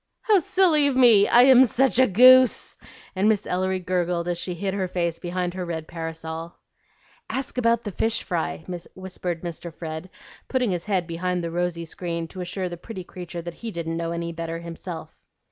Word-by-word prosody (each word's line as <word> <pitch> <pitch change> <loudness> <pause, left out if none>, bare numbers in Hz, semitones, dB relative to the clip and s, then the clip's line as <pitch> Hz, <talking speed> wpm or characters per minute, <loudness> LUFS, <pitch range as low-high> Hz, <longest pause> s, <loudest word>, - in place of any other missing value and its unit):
"How 425 -4 +4
silly 330 -4 +3
of 275 - 0
me! 230 -6 +6
I 245 - +7
am 260 -1 +8
SUCH 260 +1 +2
a 260 - +6
goose;" 255 +5 +6 0.4
and 195 +3 +3
Miss 215 -3 +1
Ellery 185 +1 0
gurgled 175 -1 -1
as 175 -1 -2
she 180 0 -4
hid 190 +2 -2
her 190 -2 -1
face 170 -2 -2
behind 180 0 -3
her 185 0 -4
red 160 -2 -5
parasol. 165 0 -6 0.7
"Ask 260 -1 -3
about 235 -1 +2
the 205 - -4
fish 225 +4 -1
fry," 80 +1 -3 0.3
whispered 185 -2 -5
Mr. 170 0 -6
Fred, 160 +2 -7 0.4
putting 250 -5 0
his 175 -2 -3
head 190 -4 0
behind 180 +1 -2
the 170 - -3
rosy 175 -1 -2
screen 170 0 -4
to 185 - -7
assure 185 +1 -3
the 175 -1 -6
pretty 185 +1 -8
creature 175 -1 -8
that 175 0 -6
he 230 - -4
didn't 165 -4 -4
know 165 0 -2
any 170 0 -3
better 165 0 -4
himself. 170 -1 -8
180 Hz, 190 wpm, -24 LUFS, 170-215 Hz, 0.7 s, am